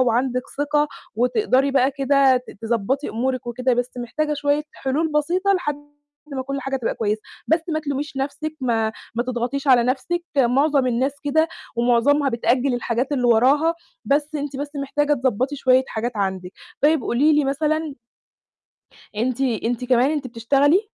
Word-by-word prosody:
وعندِك 250 +1 +1 0.2
ثِقة 295 +1 +1 0.3
وتقدري 265 - +2
بقى 265 0 +3
كده 275 -1 +3
ت 250 - -6
تضبّطي 235 +5 -1
أمورِك 255 +2 -2
وكده، 250 +1 0
بس 245 +1 -1
محتاجة 300 +6 -2
شوية 290 +1 0
حُلول 300 +4 -1
بسيطة 355 +7 +1
لحد 355 -7 -1 0.6
ما 265 -1 -2
كل 275 +1 -4
حاجة 270 0 -2
تبقى 245 -3 -2
كويسة. 215 -1 -1 0.3
بس 320 +2 +3
ما 310 -1 -1
تلوميش 285 -1 -4
نَفْسِك، 290 +3 -3
ما 225 -3 0 0.2
ما 235 - 0
تضغطيش 255 +3 -3
على 250 -2 +6
نَفْسِك، 270 +8 -1 0.2
مُعظم 275 +2 +3
الناس 255 +3 +1
كده 315 +3 +2 0.3
ومُعظمها 245 +5 +3
بتأجِّل 250 +2 +1
الحاجات 245 +3 -1
اللي 255 -3 0
وراها، 270 +8 +4 0.3
بس 295 +2 0
أنتِ 285 -2 -4
بس 285 +1 -4
محتاجة 290 +1 0
تضبّطي 260 +1 0
شوية 260 -1 +3
حاجات 235 +2 -3
عندِك. 190 -2 -2 0.3
طيب 305 +1 +4
قولي 285 +8 +2
لي 300 -1 +3
مثلًا 305 +2 -1 1.2
أنتِ 245 +4 -1
أنتِ 240 -1 -1
كمان 250 +2 +3
أنتِ 290 -4 -2
بتشتغلي؟ 275 - +2
270 Hz, 155 wpm, -22 LUFS, 245-290 Hz, 1.2 s, على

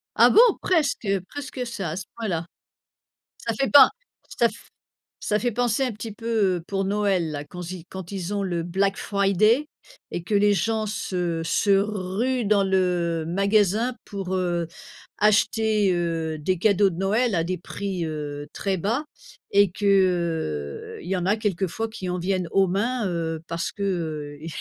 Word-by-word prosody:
Ah - - +7
bon? - - +5 0.2
Presque, 310 -9 +1
heu, 195 -1 +1
presque 270 -3 -5
ça, 205 -7 -4
à - - -4
ce 185 0 -5
point-là. 185 -8 -2 0.9
Ça 230 - -3
fait 270 - +2
pas 280 -2 +9 0.5
ça - - +6
f - - -15 0.5
ça 210 - +1
fait 240 +2 -1
penser 245 +2 +1
un 250 - -1
petit 215 +1 -7
peu, 215 -4 0
heu, 170 - -6
pour 195 -1 -1
Noël 195 -4 +1
là 145 -1 -4
quand 175 +3 -8
ils 185 -3 -7
quand 190 -2 -8
ils 195 -1 -4
ont 200 - -1
le 175 -3 -1
black 195 +4 0
friday 215 +8 +2 0.4
et 175 - -4
que 195 +5 -3
les 205 0 +4
gens 220 +2 0
se 180 -6 -2
se 200 +5 +1
ruent 210 +5 -1
dans 200 -1 +3
le 180 -4 +1
magasin 205 +5 +2
pour, 195 -2 -4
heu, 175 -2 0 0.5
acheter, 210 -1 +3
heu, 165 -2 -1
des 180 +4 -1
cadeaux 200 +1 +4
de 165 - -7
Noël 210 +5 +1
à 165 -2 +1
des 180 +1 -2
prix, 185 0 -4
heu, 145 -2 -5
très 195 -1 -1
bas 230 - -1 0.5
et 200 -1 +5
qu'il 170 - 0
y 185 +2 -2
en 180 -1 -2
a 205 +3 +3
quelquefois 210 +1 -2
qui 220 -4 -6
en 180 0 -2
viennent 180 0 -1
aux 195 -1 +4
mains, 215 +5 0
heu, 165 -2 -3
parce 165 -1 -3
que, 200 - -7
heu, 155 -5 -3
195 Hz, 175 wpm, -24 LUFS, 175-215 Hz, 0.9 s, pas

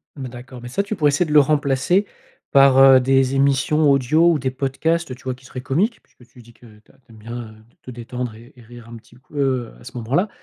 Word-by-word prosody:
Mmh 135 -3 -7
d'accord, 125 +1 -11
mais 120 - -9
ça 200 +10 -1
tu 205 +1 -5
pourrais 150 -4 +2
essayer 145 +5 +1
de 150 - -4
le 150 - +8
remplacer 145 +6 +1 0.5
par, 135 -1 +5
heu, 135 -1 +8
des 135 +1 +1
émissions 140 +2 +2
audio 155 +6 +3
ou 155 - 0
des 130 0 -2
podcasts, 140 +3 -2
tu 125 - -20
vois? 130 -1 -4
Qui 130 +1 -21
seraient 130 -1 -8
comiques 185 - -1
puisque 125 - -23
tu 125 - -16
dis 120 0 -18
que 120 - -20
tu 105 - -26
as - - -28
tu 120 -3 -25
aimes 110 - -16
bien, 115 +3 -8
heu, 110 - -16 0.3
te 125 - -9
détendre 120 0 -6
et 115 +2 -16
et 120 - -17
rire 120 0 -14
un 115 - -10
petit 115 - -20
coup, 140 +3 -21
heu, 130 -4 -1
à - - -17
ce 130 +1 -12
moment-là 135 - 0
135 Hz, 260 wpm, -20 LUFS, 120-145 Hz, 0.5 s, le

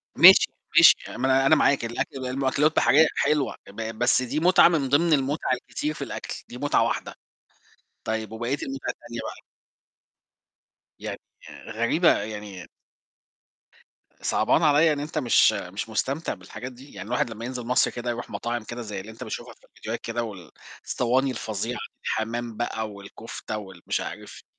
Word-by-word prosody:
ماشي، - - +9 0.3
ماشي، - - +10
آآ - - -8
ما 130 - -1
أنا 135 0 +4
أنا 155 - +6
معاك 140 -4 +3
الأكل 125 +3 -4
ده 125 - -3
المأكلات 135 +4 +1
بحرية 155 +3 +5
حلوة 150 -2 +1
ب 110 +2 -6
بس 120 +1 +3
دي 130 +5 -2
مُتعة 180 +2 +6
من 150 -6 +1
ضِمن 160 +3 +4
المُتعة 140 -1 +1
الكتير 150 +4 -3
في - - -6
الأكل - - -6 0.2
دي - - -8
مُتعة - - +2
واحدة. - - -2 0.9
طيب 110 0 -3
وبقيت 120 +5 -3
المُتع 135 0 -5
التانية 120 0 -5
بقى؟ - - -8 1.6
يعني - - -5 0.5
غريبة 115 +10 +3
يعني 105 -4 -7 1.5
صعبان 120 +9 +2
عليّا 155 +1 +5
إن 145 - -4
أنت 150 +2 -5
مش 120 -4 +4
مش 100 +2 -5
مستمتع 135 +8 -2
بالحاجات 100 +7 -9
دي، 130 +3 -15
يعني - - -8
الواحد 120 0 0
لمّا 115 +1 -7
ينزل 125 -1 -5
مصر 125 +1 +2
كده 120 0 -5
يروح 120 0 -4
مطاعم 120 -1 -3
كده 120 +2 -7
زي 105 -3 -5
اللي 105 +4 -9
أنت 110 - -9
بتشوفها - - -6
في - - -25
الفيديوهات 115 +2 -6
كده، 115 +1 -3
وال 95 -8 -9 0.3
صواني 130 +2 +1
الفظيعة، 115 +1 -4 0.3
حمام 115 0 -2
بقى 110 -2 -2
والكفتة 100 +2 -7
وال 95 -4 -10
مش - - 0
عارف - - -8
120 Hz, 165 wpm, -25 LUFS, 110-135 Hz, 1.6 s, ماشي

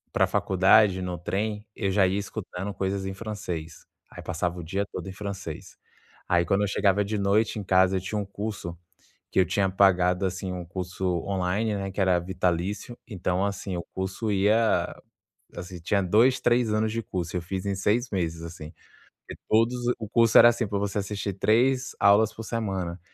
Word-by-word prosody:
pra - - +4
faculdade 95 0 +4
no 90 -1 -3
trem, 105 +5 -3
eu 100 -3 -1
já 95 -1 +4
ia 95 +2 0
escutando 100 -1 -5
coisas 95 0 -2
em 95 - -4
francês. 95 -6 -6 0.2
Aí - - -10
passava 85 +1 -2
o 85 - -6
dia 95 +5 -2
todo - - -6
em - - -6
francês. 100 -5 -7 0.5
Aí, 85 0 +3
quando 95 +4 +1
eu 105 - +1
chegava 100 0 +2
de 105 +1 -3
noite 105 +2 +1
em - - -5
casa, 95 0 +4
eu - - -3
tinha 105 +3 -4
um 105 - -1
curso 100 -4 -6 0.5
que - - -1
eu 95 - +5
tinha 95 +2 +1
pagado, 90 -1 +3
assim, 95 0 -4
um 90 -1 -5
curso 90 +2 -5 0.2
online, 100 +3 -1
né, 95 -1 -4
que 100 - -4
era 95 -2 +3
vitalício. 95 +5 -2
Então, 95 -3 -1
assim, 100 -2 -4
o 85 - -4
curso 95 +3 -2
ia, 105 +3 +2 0.6
assim, 90 +1 -7
tinha 100 +3 +1
2, 115 +8 +4
3 120 -2 +2
anos 110 0 0
de 115 - -1
curso, 90 -3 -4
eu 90 - 0
fiz 95 +2 -5
em 100 -1 -1
6 105 +6 +1
meses, 85 -4 -2
assim. 80 -2 -9 0.6
E - - -5
todos 115 +3 +3 0.2
o 110 - -5
curso 115 -1 +4
era, 120 - +10
assim, 120 -1 -1
pra 100 0 -2
você 100 0 -2
assistir 100 0 -3
3 125 +6 +2
aulas 100 +2 +4
por 115 - -7
semana, 95 -6 -3
95 Hz, 190 wpm, -26 LUFS, 90-105 Hz, 0.6 s, era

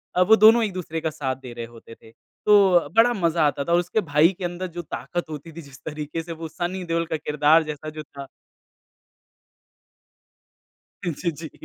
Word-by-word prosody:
अ, 180 - +3
वो 220 +5 +6
दोनों 225 +2 +6
एक 205 -4 -2
दूसरे 165 -3 -5
का 160 - -1
साथ 140 -4 -3
दे 120 - -8
रहे 120 -1 -6
होते 115 0 -14
थे। 110 - -19 0.3
तो 190 -7 +5
बड़ा 240 +2 +5
मज़ा 170 -5 +1
आता 140 -1 -2
था। 170 - -3
और 175 - +5
उसके 175 +5 -1
भाई 150 +4 +5
के 180 - -3
अंदर 175 +1 -4
जो - - -2
ताकत 170 +1 -5
होती 155 +2 -8
थी 165 +2 -9
जिस 140 -2 -15
तरीके 155 +1 -5
से 170 - -9
वो 165 - -4
सनी 180 +3 -4
देओल 165 0 -1
का 160 - 0
किरदार 150 +1 +3
जैसा 155 0 -6
जो 155 0 -8
था 140 -1 -11 2.8
जी, 170 0 -2
जी। 160 0 -9
165 Hz, 195 wpm, -23 LUFS, 150-180 Hz, 2.8 s, वो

